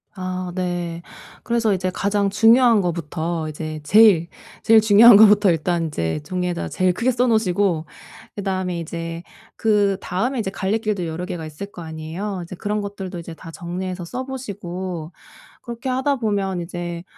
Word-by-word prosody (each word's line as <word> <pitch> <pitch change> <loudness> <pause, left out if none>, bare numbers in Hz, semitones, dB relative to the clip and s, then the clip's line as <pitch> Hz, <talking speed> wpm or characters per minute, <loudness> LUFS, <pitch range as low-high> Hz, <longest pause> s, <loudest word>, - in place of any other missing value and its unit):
아 185 -1 -4
네. 175 -2 -3 0.4
그래서 235 -3 +1
이제 185 0 -1
가장 200 +1 0
중요한 225 +2 +5
것부터 165 -1 -3
이제 155 0 -6
제일, 190 0 +5 0.3
제일 225 0 +6
중요한 220 +1 +8
것부터 205 -2 +6
일단 170 +1 0
인제 85 - -2
종이에다 180 +1 -3
제일 185 -1 +1
크게 245 +7 +1
써 245 +1 +1
놓으시고 195 -7 +1 0.5
그다음에 185 -3 -2
이제 165 +1 -6 0.3
그다음에 205 +3 0
이제 190 -4 -2
갈래길도 205 -2 -1
여러 165 +2 -4
개가 175 -4 -5
있을 200 +7 -8
거 - - -10
아니에요. 165 +5 -5
이제 170 +2 -9
그런 210 +3 -2
것들도 195 -3 -6
이제 170 0 -8
다 165 - -12
정리해서 180 +1 -5
써 250 +9 -5
보시고 185 -9 -6 0.5
그렇게 240 +2 -5
하다 265 +2 0
보면 200 -6 -1
이제 175 0 -5
185 Hz, 340 characters per minute, -21 LUFS, 170-210 Hz, 0.5 s, 중요한